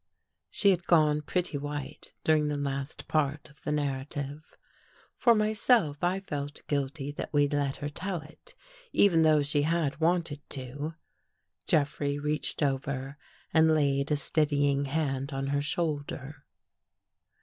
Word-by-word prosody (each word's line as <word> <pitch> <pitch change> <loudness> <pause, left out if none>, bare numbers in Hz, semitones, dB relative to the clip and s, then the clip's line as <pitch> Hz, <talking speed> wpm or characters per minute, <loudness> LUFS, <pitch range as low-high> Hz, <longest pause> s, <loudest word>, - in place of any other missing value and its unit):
She 200 - +4
had 175 -2 -1
gone 150 -3 +4
pretty 170 -1 -1
white 145 -1 -6
during 155 -1 +3
the 150 -1 -1
last 140 0 -4
part 145 -3 0
of 150 - -23
the - - -3
narrative. 145 0 -3 0.7
For 235 -2 +4
myself, 215 - +2
I 185 +2 +1
felt 145 -5 -5
guilty 140 0 -2
that 145 - -6
we'd 145 -1 +2
let 140 -2 0
her 145 - -4
tell 180 +3 -3
it, 165 - -14 0.4
even 175 -5 +5
though 155 -2 +5
she 145 +1 +1
had 155 -1 0
wanted 165 -3 +1
to. 145 +4 -5 0.7
Jeffrey 145 -1 +1
reached 150 +1 -1
over 135 0 -2 0.3
and 160 -1 +5
laid 140 -2 +1
a 150 - +3
steadying 145 -2 +1
hand 140 -1 -1
on 135 0 -2
her 140 0 +1
shoulder. 145 -3 -3
145 Hz, 140 wpm, -29 LUFS, 140-160 Hz, 0.7 s, even